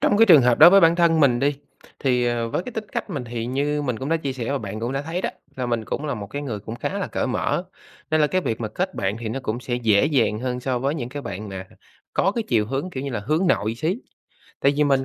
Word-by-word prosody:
trong 205 - +3
cái 225 - +7
trường 155 -8 +8
hợp 120 -1 +3
đối 175 - +10
với 195 0 +7
bản 165 0 +5
thân 165 -2 +4
mình 125 -4 +4
đi, 145 +1 +2 0.4
thì, 125 -2 +1
ờ, 120 -1 0
với 170 - -2
cái 250 - -8
tính 220 -1 -4
cách - - -3
mình 140 -7 -4
thì 115 -1 -4
như 145 +3 -1
mình 125 -5 -2
cũng 135 +2 -4
đã 165 - +2
chia 140 -4 -3
sẻ 125 -1 -4
và 140 - 0
bạn 105 0 -6
cũng 120 +3 -2
đã 135 +1 -2
thấy 165 +4 -3
đó, - - -1 0.3
là 125 -1 -2
mình 115 -2 -1
cũng 150 - -4
là 140 -3 -1
một 100 -2 -6
cái 145 +7 -5
người 115 -7 -4
cũng 110 +2 -7
khá - - -3
là - - -2
cởi - - -2
mở, - - -1 0.5
nên 155 0 +3
là 150 - +5
cái 185 +4 0
việc 115 -8 -3
mà 110 - -2
kết 185 - -3
bạn 100 +2 -1
thì 115 -2 -4
nó 135 +4 -3
cũng 120 +1 -3
sẽ 120 0 -3
dễ 115 0 +3
dàng 125 -8 +1
hơn 125 -1 -2
so 125 -1 -1
với 140 +4 -1
những 125 -6 -4
cái 145 +2 -6
bạn 100 +2 -6
mà 95 -1 -7 0.5
có 195 - +2
cái 230 +1 -2
chiều 110 -4 +2
hướng, 135 +9 -3
kiểu 135 -3 -5
như 140 - -4
là, 115 -4 -3
hướng 155 - 0
nội 110 -9 +1
xí. 160 - -1 0.6
Tại 140 - +4
vì 150 - +3
mình 135 -2 +2
130 Hz, 300 wpm, -23 LUFS, 115-155 Hz, 0.6 s, đối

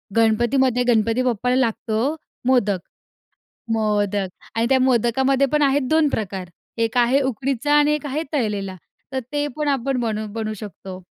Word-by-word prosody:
गणपतीमध्ये 240 +3 +3
गणपती 230 +1 +2
बाप्पाला 250 0 0
लागतो 235 +2 0 0.3
मोदक. 210 -7 +3 0.9
मोदक 205 -3 0 0.3
आणि 230 +1 +1
त्या 265 0 +4
मोदकामध्ये 260 +2 +2
पण 300 0 +3
आहेत 280 0 +3
2 315 -1 +4
प्रकार. 195 -7 -4 0.3
एक 230 +1 0
आहे 245 +3 +4
उकडीचा 270 +2 0
आणि 295 0 +4
एक 300 0 -4
आहे 290 +3 -2
तळलेला. 205 -8 -2 0.4
तर 265 - -1
ते 290 0 0
पण 300 -1 -1
आपण 270 -1 0
बनू 220 -2 -2
बनवू 220 -1 -3
शकतो. 190 -3 -9
240 Hz, 145 wpm, -22 LUFS, 215-270 Hz, 0.9 s, त्या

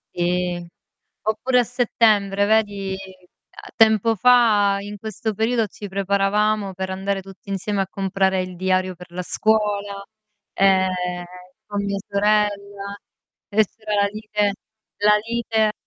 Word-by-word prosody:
Sì. 175 0 -1 0.6
Oppure 220 +4 +1
a - - +1
settembre, 215 -5 +2
vedi, 205 -3 +1 0.7
a 405 - -11
tempo 225 -1 +4
fa 215 -3 +4
in 205 +1 -7
questo 220 0 -4
periodo, 225 +1 +1
ci 205 +1 -9
preparavamo 200 +1 +1
per 190 0 -4
andare 195 +1 -2
tutti 195 +1 -15
insieme 195 +1 -2
a 190 - -1
comprare 190 -1 0
il 185 0 -7
diario 185 0 0
per 180 0 -13
la 180 +1 -4
scuola, 205 -1 0 0.5
ehm, 185 -2 +2 0.4
con 205 -1 -3
mia 200 0 -1
sorella, 200 -1 0 0.5
e 215 +1 +3
c'era 215 -1 -4
la - - +3
lite 210 -1 -1 0.5
la 210 0 +6
lite 225 -2 +1
200 Hz, 130 wpm, -22 LUFS, 190-215 Hz, 0.7 s, la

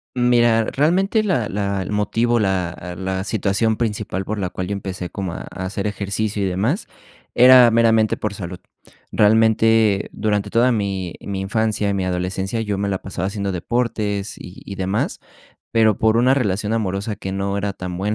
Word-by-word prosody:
Mira, 120 -2 +3
realmente 190 - +1
la 165 - 0
la 100 -1 -2
el 95 - -5
motivo, 115 +3 +1
la 90 -3 -2
la 95 0 -3
situación 110 +2 0
principal 105 -4 -2
por 105 +1 -3
la 95 -2 -2
cual 90 0 -5
yo 100 - -2
empecé 95 -2 -5
como 95 -4 -4
a - - -7
a 95 - -7
hacer 100 +2 -3
ejercicio 105 0 -2
y - - +1
demás, 110 - -1 0.5
era 125 -1 +8
meramente 115 -1 +3
por 105 -1 -3
salud. 90 -3 -7 0.5
Realmente, 110 -1 +3
durante 105 -1 -1
toda 120 +3 +3
mi 95 -5 -2
mi 100 -1 -4
infancia 105 +1 0
y 100 - 0
mi 95 - -1
adolescencia, 95 +4 -2
yo 105 -3 -2
me 100 0 -1
la 95 -1 -2
pasaba 95 -1 -4
haciendo 100 -1 -3
deportes 105 0 -2
y 90 - -11
y 100 - -7
demás, 95 +2 -2 0.5
pero 110 -3 +3
por 110 0 +3
una 125 +3 +4
relación 105 -5 -1
amorosa 105 -1 -2
que 95 -1 -5
no 100 +1 -2
era 100 0 -2
tan 90 -2 -6
buena, 105 +3 -1
105 Hz, 180 wpm, -20 LUFS, 95-115 Hz, 0.5 s, era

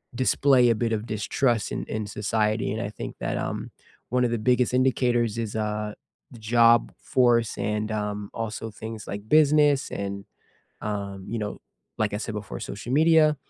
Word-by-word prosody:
display 130 0 +4
a 115 - +3
bit 115 +1 -1
of 110 +1 -2
distrust 110 +1 0
in - - -3
in 110 -1 -4
society, 105 0 0
and 110 +2 -2
I 105 - -3
think - - -7
that, - - -2
um, - - -4 0.4
one 125 +1 +2
of 120 - +1
the 120 - 0
biggest 125 +2 +2
indicators 120 -3 +2
is, 110 -2 -3
uh, 105 -1 -2 0.4
the 120 - -12
job 115 +1 +4
force 120 -3 +2
and, 105 0 -2
um, 105 -1 -3
also 115 0 -4
things 110 0 -8
like 100 +1 -6
business 150 -1 +4
and, 100 0 -4 0.6
um, 100 -2 -4
you 115 - -3
know, 105 -1 -4 0.4
like 110 -2 0
I - - -1
said 110 0 -5
before, 105 -1 -6
social 110 +5 -6
media. 155 0 +5
110 Hz, 175 wpm, -25 LUFS, 105-125 Hz, 0.6 s, media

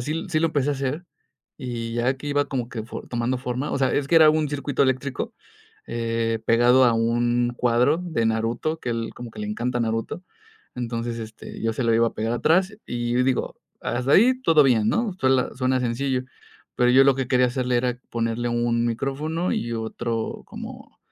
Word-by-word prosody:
sí 155 +8 -3
sí 155 -3 +1
lo 165 - +3
empecé 145 -2 0
a - - +1
hacer 140 +5 -3 0.5
y 115 -2 -5
ya 120 +3 +1
que 140 - -9
iba 145 0 +1
como 125 -5 -3
que 115 -3 -5
fo 110 - -7
tomando 120 +1 -1
forma, 125 +3 -3
o - - -1
sea, 130 -1 +2
es 140 -1 0
que 170 - +4
era 160 -1 +8
un 155 -1 +2
circuito 140 -1 -1
eléctrico, 130 0 -1 0.5
eh, 115 -1 -1
pegado 120 +3 +5
a 120 -2 +4
un 120 +1 +1
cuadro 125 +6 +2
de 160 -11 -1
Naruto, 115 +8 -1
que - - -5
a - - +1
él 115 -1 -3
como 120 -1 -8
que - - -13
le 210 - -3
encanta 125 -13 -2
Naruto. 115 +9 -2 0.5
Entonces, 115 -1 -3
este, 110 0 -9
yo 115 0 +1
se 120 +3 -2
lo 115 -1 +3
iba 115 +1 +4
a - - -13
pegar 115 +2 -2
atrás 185 - +2
y, 120 0 -2
digo, 130 -1 -1 0.2
hasta 125 +2 -2
ahí 235 +9 +6
todo 155 - +5
bien, 115 -5 +3
¿no?, 230 - 0
suela 130 -1 +2
suena 130 0 +1
sencillo, 125 +2 -1 0.5
pero 125 0 +3
yo 130 +2 +6
lo 140 -1 +5
que 130 -1 -3
quería 125 -1 +4
hacerle 125 0 0
era 125 0 -1
ponerle 115 +1 -1
un 120 0 +1
micrófono 140 +8 -2
y 120 0 -2
otro 115 0 -3
como, - - -10
125 Hz, 200 wpm, -24 LUFS, 115-140 Hz, 0.5 s, era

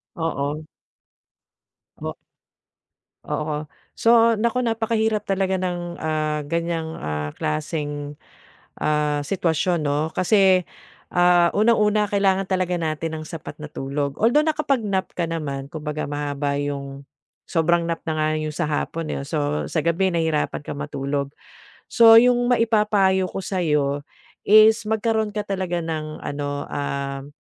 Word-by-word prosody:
Oo. 155 -2 -2 1.4
O - - -4 1.1
Oo. 150 0 -3 0.3
So 230 -1 +5
naku, 235 +3 +1
napakahirap 225 -2 0
talaga 190 -1 0
ng, 175 -1 -4
ah, 155 -1 -1
ganiyang, 165 0 -2
ah, 75 0 -3
klaseng, 145 - -3 0.6
ah, 150 -1 +1
sitwasyon, 165 +1 0
'no, 145 +2 0
kasi, 190 -1 +4 0.5
ah, 175 -1 +4
unang-una 210 -1 +3
kailangan 195 -1 +1
talaga 185 -2 0
natin 160 0 -3
ng 155 - -8
sapat 160 -1 -8
na 150 - -6
tulog, 140 0 -3
although 245 +8 +3
nakapag-nap 235 -11 0
ka 170 -2 -2
naman, 140 -5 -4
kumbaga 150 0 -4
mahaba 145 0 -2
'yung 140 -1 -4 0.4
sobrang 170 0 +1
nap 165 0 -2
na 160 - 0
nga 155 0 +1
'yong 155 -1 -4
sa 175 - -1
hapon, 155 +1 -2
eh, 140 - -4
so 150 -1 -1
sa 155 - -1
gabi 170 +4 +2
nahirapan 160 -5 -1
ka - - -6
matulog. 140 0 -3 0.6
So 225 -1 +8
'yung 245 +1 +5 0.2
maipapayo 210 -5 +2
ko - - -4
sa'yo, 150 -7 0 0.4
is 215 +2 +6
magkaroon 220 0 0
ka 210 0 -2
talaga 185 -3 -2
ng 155 -2 -4
ano, 145 0 -4
um, 140 0 -4
165 Hz, 125 wpm, -23 LUFS, 145-195 Hz, 1.4 s, So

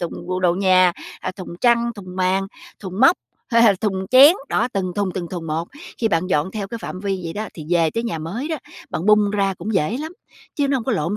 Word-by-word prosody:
thùng 175 - -3
bộ 185 +1 -2
đồ 175 -2 +3
nhà, 185 -1 +4 0.3
à, - - -3
thùng 180 -2 -8
chăn, 235 -1 +3
thùng 185 -3 -10
màn, 190 +1 +1 0.3
thùng 190 0 -6
móc, 270 +7 +6 0.3
hay 230 -1 +4
là 210 -4 +6
thùng 190 -3 -1
chén. 270 +5 +9 0.2
Đó, 240 - +1
từng 185 -2 -2
thùng, 200 -2 0
từng 175 -3 -4
thùng 170 -2 -6
một, 160 +2 -3 0.3
khi 225 - +1
bạn 170 -2 0
dọn 170 -1 0
theo 200 -1 -5
cái 230 - -5
phạm 185 -4 -7
vi 195 -1 -2
vậy 165 - -4
đó, 210 +1 -4
thì 155 - -8
về 165 -2 +3
tới 230 - -2
nhà 220 -8 -3
mới 200 - -4
đó, 320 - -1 0.3
bạn 170 - -3
bung 210 -1 +5
ra 200 -1 0
cũng 200 +5 -5
dễ 185 +6 +1
lắm, 315 +3 -6 0.4
chứ 285 -2 +1
nó 275 - +2
hông 235 - -4
có 260 - 0
lộn 185 0 -1
195 Hz, 255 wpm, -21 LUFS, 180-225 Hz, 0.4 s, chén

